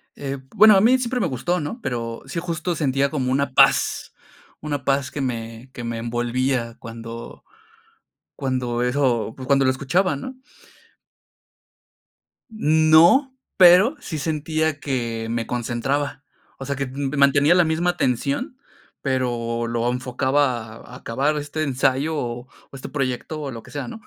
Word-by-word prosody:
Eh, 140 -1 -5 0.2
bueno, 215 0 +8
a 190 - +5
mí 245 +4 +5
siempre 250 0 -2
me 195 - +1
gustó, 170 +6 -1
¿no?, 155 - -5
pero 115 -3 -4
sí 170 - -4
justo 170 0 -3
sentía 140 -2 +1
como 130 -4 -2
una 140 0 0
paz, - - +3 0.5
una 145 -2 -3
paz 135 -1 0
que 145 - -4
me 115 -1 -5
que 120 - -7
me 115 0 -3
envolvía 120 +1 -1
cuando 115 0 -9 0.9
cuando 125 -3 -2
eso, 125 -3 0
pues, 130 -1 -8
cuando 140 -1 +3
lo 130 - +4
escuchaba, 145 +6 0
¿no? 260 - -7 2.2
No, 170 - +4 0.2
pero 185 - +7
sí 160 - -6
sentía 155 0 -1
que 120 -5 -3
me 115 0 -2
concentraba, 130 +4 -2 0.3
o 135 - -7
sea, 140 - -2
que, 140 -1 -3
mm, 140 +2 -4
mantenía 140 +3 +4
la 180 0 +5
misma 165 +2 +1
atención, 140 - -1 0.5
pero 120 -3 -1
lo 115 0 -1
enfocaba 125 -2 -1
a 125 - -13
acabar 140 +6 -1
este 145 +2 -4
ensayo 140 +2 0
o 120 -3 -3 0.3
o - - -11
este 135 - -8
proyecto 135 +2 -3
o 140 -2 -4
lo 115 -2 -8
que - - -16
sea, 140 -4 -5
¿no? 220 - -9
135 Hz, 150 wpm, -22 LUFS, 120-155 Hz, 2.2 s, bueno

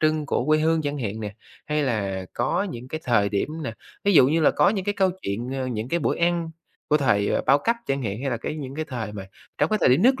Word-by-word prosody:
trưng 155 -1 +1
của 125 - 0
quê 155 0 +4
hương 160 0 +2
chẳng 145 0 -2
hạn 110 -3 -3
nè, 105 -1 -5 0.3
hay 150 0 0
là 100 -7 -1
có - - 0
những 120 +2 -8
cái 155 - -4
thời 110 -5 +3
điểm 100 +4 -1
nè, 125 -6 -3 0.3
ví 200 - +4
dụ 130 -4 +7
như 160 +3 +2
là 155 - +5
có - - +3
những 195 -2 -1
cái 205 - 0
câu 190 -2 +3
chuyện, 115 +6 -3
ờ, 130 -1 -2
những 115 -1 -3
cái 170 - +1
bữa - - 0
ăn 170 -1 +1 0.4
của 150 - +4
thời 105 -8 +2
bao 140 +1 +6
cấp 230 +10 +1
chẳng 135 -1 -1
hạn, 105 0 -3
hay 135 0 -2
là 120 - 0
cái 150 - -5
những 135 -3 -6
cái 155 - -3
thời 120 -7 -5
mà 100 -2 -7 0.3
trong - - +2
cái 215 - +2
thời - - +5
điểm 130 +9 +4
nước 260 +2 +4
135 Hz, 275 wpm, -24 LUFS, 110-155 Hz, 0.4 s, dụ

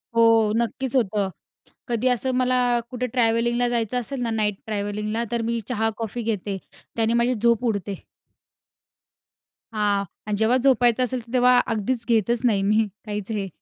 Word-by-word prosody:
हो, 225 -2 +5
नक्कीच 250 +3 -2
होतं. 205 -5 +1 0.6
कधी 240 +1 0
असं 255 +1 +1
मला 255 0 +2 0.3
कुठे 250 0 -3
ट्रॅव्हलिंगला 240 0 +2
जायचं 235 0 0
असेल 250 +2 -4
ना, 235 - -1
नाईट 210 -2 0
ट्रॅव्हलिंगला, 210 +1 -2
तर 235 - 0
मी 235 0 0
चहा, 225 -2 0
कॉफी 230 +1 -4
घेते, 205 -3 -2 0.4
त्याने 225 0 +1
माझी 235 +1 +2
झोप 235 +1 +1
उडते. 200 -3 -2 1.7
हां 205 -2 +1 0.2
आणि 210 -1 -1
जेव्हा 220 +4 +3
झोपायचं 250 -2 +4
असेल, 255 0 -1
तर 230 - -13
तेव्हा 250 0 +5
अगदीच 225 +2 -1
घेतच 235 0 +2
नाही, 210 -4 +3
मी 215 +2 +2 0.2
काहीच 210 0 -5
हे. 205 -2 -2
230 Hz, 155 wpm, -23 LUFS, 210-245 Hz, 1.7 s, हो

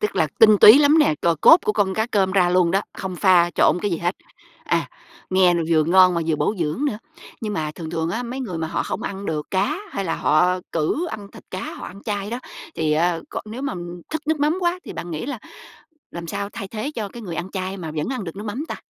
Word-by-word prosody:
Tức 210 - -2
là 160 - +3
tinh 215 -2 +7
túy 220 +6 +10
lắm 295 +2 +5
nè. 300 - +4
C 165 0 0
Cốt 325 - +9
của 210 - +1
con 195 -3 0
cá 220 +1 0
cơm 195 -5 +1
ra 180 -3 +3
luôn 180 -2 +3
đó, 195 - +2 0.2
không 185 -2 -5
pha 175 -2 +4
trộn - - +3
cái 205 - 0
gì 170 - -1
hết. 175 +2 -1 0.5
À. - - 0 0.4
Nghe 185 -1 +4
vừa 155 -2 +3
ngon 185 +1 +5
mà 170 - 0
vừa 160 -2 +1
bổ 150 +9 0
dưỡng 165 - -1
nữa. 215 -7 -1 0.4
Nhưng 215 -2 -3
mà 155 -6 -2
thường 160 -2 -7
thường 160 +1 -2
á 235 +7 -2
mấy 250 +3 -5
người 185 -10 -4
mà 160 - -2
họ - - -2
không - - -4
ăn 200 0 -5
được 150 -2 -3
cá 275 - 0
hay 195 - -3
là 165 -2 -1
họ 180 +4 +2
cự 170 - 0
ăn 200 -2 -8
thịt - - -13
cá, 185 - -5
họ - - -8
ăn 195 +3 -11
chay 205 -1 -3
đó 240 - -3 0.4
thì 155 -1 0
á 165 +2 +1
c - - -9
nếu 235 +5 -7
mà 280 - -2 0.4
thức 315 0 -3
nước 315 -1 0
mắm 300 +4 +2
quá 350 0 0
thì - - -7
bạn 175 - -7
nghĩ 155 +7 -4
là 275 -4 -4 0.7
làm 170 0 -7
sao 200 +4 -4
thay 195 - -6
thế 225 +7 -4
cho 215 -3 -3
cái 235 +3 -10
người 175 -5 -6
ăn 180 +2 -4
chay 190 0 -4
mà 165 -4 -6
vẫn 155 +5 -3
ăn 255 -7 -3
được 165 +2 -7
nước 210 - -7
mắm 240 +9 -4
ta? - - -4
190 Hz, 265 wpm, -22 LUFS, 170-220 Hz, 0.7 s, túy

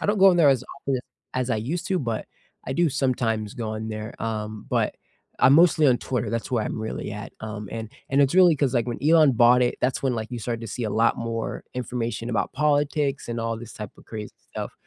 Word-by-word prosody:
I - - -2
don't 205 0 +2
go 195 - +7
on 175 - +2
there 155 -4 +6
as 135 -3 +3 0.2
often 135 -2 -1 0.4
as 130 0 -1
I 110 - +2
used 155 +11 -3
to, 190 -1 +1
but 115 -5 -3 0.4
I 130 - -2
do 170 +2 +3
sometimes 120 -6 -1
go 115 -3 -4
on 110 0 -4
there, 110 +1 -6
um, 110 -1 -4
but - - 0 0.4
I'm 130 - +6
mostly 160 -2 +6
on 125 -2 +5
Twitter, 125 -3 -2
that's 115 -1 -3
where 115 -4 +1
I'm - - -3
really 110 -1 -4
at, 105 0 -7
um, 105 -2 -6
and 110 -1 -5 0.2
and 140 +1 +3
it's 140 +4 +3
really 180 -3 +7
'cause, 135 -2 +1
like, 120 0 +1
when 120 - -3
Elon 155 -2 +6
bought 120 +2 +5
it, 120 - +1
that's 125 +1 0
when, 130 -2 +1
like, 110 +1 -4
you 120 - -3
started 115 0 -3
to - - -5
see 120 +3 -5
a 110 - -1
lot 115 +2 +2
more 115 -1 -3
information 120 -1 -3
about 115 - -1
politics 145 -2 +1
and 120 0 -3
all 115 0 -2
this 115 -1 -9
type 105 -2 -7
of - - -17
crazy 105 -2 -7 0.2
stuff, - - -5
120 Hz, 240 wpm, -25 LUFS, 110-140 Hz, 0.4 s, go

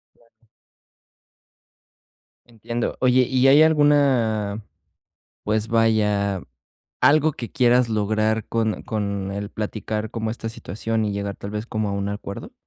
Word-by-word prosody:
Claro. 115 0 -31 2.0
Entiendo, 115 0 -4
oye, 130 0 +4
¿y 130 +1 +2
hay 145 +3 +7
alguna, 130 -9 +2 0.8
pues, 110 +1 0
vaya, 105 -4 +1 0.6
algo 155 +1 +4
que 120 -4 -7
quieras 125 -1 +3
lograr 110 0 0
con 110 -2 -1
con 100 -3 -3
el 100 +1 -5
platicar 110 0 -4
como 110 -1 -3
esta 115 0 -5
situación 110 +1 -3
y 105 - -1
llegar 100 0 -3
tal 100 - -7
vez 105 +2 -4
como 110 -2 -2
a 100 - -2
un 100 0 -2
acuerdo? 100 -1 -7
110 Hz, 130 wpm, -22 LUFS, 105-120 Hz, 2.0 s, hay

